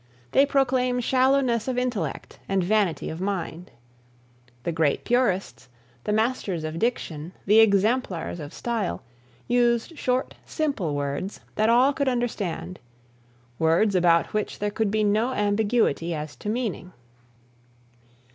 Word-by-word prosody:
They 275 +1 +5
proclaim 255 -3 +1
shallowness 255 -2 +2
of 255 -1 -1
intellect 250 0 -3
and 195 -1 +1
vanity 190 -6 +1
of 160 +3 -7
mind. 180 -3 -3 0.9
The 170 - -1
great 160 -3 +1
purists, 210 - 0 0.4
the - - 0
masters 215 -6 0
of 155 +1 -4
diction, 170 -8 -2
the 210 +3 +6
exemplars 205 -4 +2
of 145 -2 -7
style, 225 - -3 0.4
used 240 +5 +1
short, 255 +1 0
simple 250 - -2
words 145 +7 -3
that 215 +1 +2
all 250 +4 +5
could 280 -3 0
understand; 195 -8 -3 0.8
words 165 +6 +3
about 170 -2 +3
which 210 -1 -2
there 205 0 -2
could 215 0 0
be 215 +1 +1
no 215 +5 +1
ambiguity 205 - +1
as 150 -1 -6
to 210 - -5
meaning. 215 -6 -3
210 Hz, 130 wpm, -25 LUFS, 175-245 Hz, 0.9 s, the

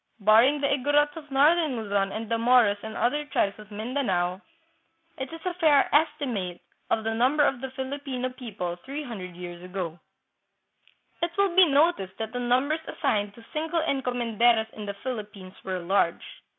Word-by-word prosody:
Barring 230 +8 +5
the 280 - +2
Igorots 290 +2 +2
of 305 -2 -10
northern 295 +1 +3
Luzon 200 -3 -1
and 220 +1 -5
the 230 +1 0
Moros 230 -3 +4
and 220 0 -7
other 295 +5 +1
tribes 205 -8 0
of 210 -1 -12
Mindanao, 205 -5 -1 0.8
it 265 0 -5
is 330 +1 -10
a 365 - -1
fair 310 -6 +3
estimate 250 - 0 0.3
of 220 - +1
the 225 0 -1
number 260 +6 +3
of 250 -3 0
the 265 - -4
Filipino 265 -1 -4
people 210 -9 -5
three 275 +10 -6
hun 235 -7 -7
dred 180 -1 -8
years 175 -1 -8
ago. 180 -2 -5 1.2
It 340 - +1
will 395 -3 +2
be 375 0 +8
noticed 280 - +2
that 220 +1 -5
the 245 - -2
numbers 255 +6 +1
assigned 205 -8 -1
to 230 - -15
single 320 +1 -1
encomenderos 240 -5 +1
in 210 -1 -7
the 200 - -4
Philippines 205 -5 -7
were 190 -1 -3
large. 175 -1 0
245 Hz, 170 wpm, -26 LUFS, 205-285 Hz, 1.2 s, be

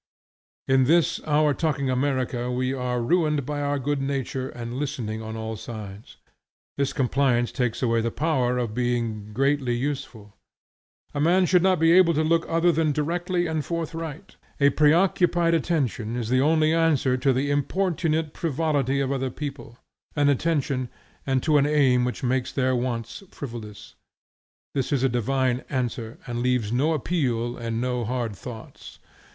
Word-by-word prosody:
In 135 -1 +4
this 165 +4 +3
our 150 -1 +3
talking 140 -3 -1
America 130 -2 -1
we 130 +1 -1
are 125 -2 -2
ruined 150 -1 +1
by 145 +1 -3
our 145 0 0
good 140 +1 -1
nature 135 -1 -2
and 120 -1 -7
listening 120 -5 -3
on 110 0 -6
all 110 0 -4
sides. 105 -2 -9 0.6
This 140 -1 0
compliance 130 -3 +1
takes 125 -2 -2
away 115 -2 +2
the 115 - 0
power 130 -3 0
of 120 -4 -2
being 115 -3 -2
greatly 135 +1 +1
useful. 130 -6 -5 0.8
A 145 - -2
man 180 +4 +4
should 180 0 +4
not 185 0 +3
be 165 +1 +4
able 170 -2 +5
to 155 - +2
look 165 +1 +1
other 165 +1 +3
than 160 -2 +1
directly 175 +4 -1
and 160 -2 -1
forthright. 165 -2 -5 0.2
A 140 0 +5
preoccupied 170 +2 +3
attention 135 -9 -1
is 120 -2 -3
the 130 +1 +3
only 155 +1 +3
answer 155 -6 +2
to 135 +2 +2
the 135 +3 0
importunate 160 0 0
frivolity 145 -3 0
of 135 0 -1
other 135 -1 -1
people; 140 -3 -7 0.4
an 145 -1 +3
attention, 140 -3 0 0.4
and 130 -1 +1
to 150 -2 +4
an 140 - +2
aim 135 -5 +3
which 125 - -4
makes 130 0 0
their 130 -1 +1
wants 120 - -3
frivolous. 115 -6 -8 0.8
This 135 -2 -1
is 135 -3 +1
a 135 - +3
divine 125 +1 0
answer, 120 -3 -3
and 120 0 -3
leaves 125 -4 0
no 140 +7 +2
appeal 125 -7 -1
and 115 -2 -3
no 125 0 -1
hard 120 -2 -2
thoughts. 110 +2 -10
135 Hz, 160 wpm, -25 LUFS, 120-155 Hz, 0.8 s, able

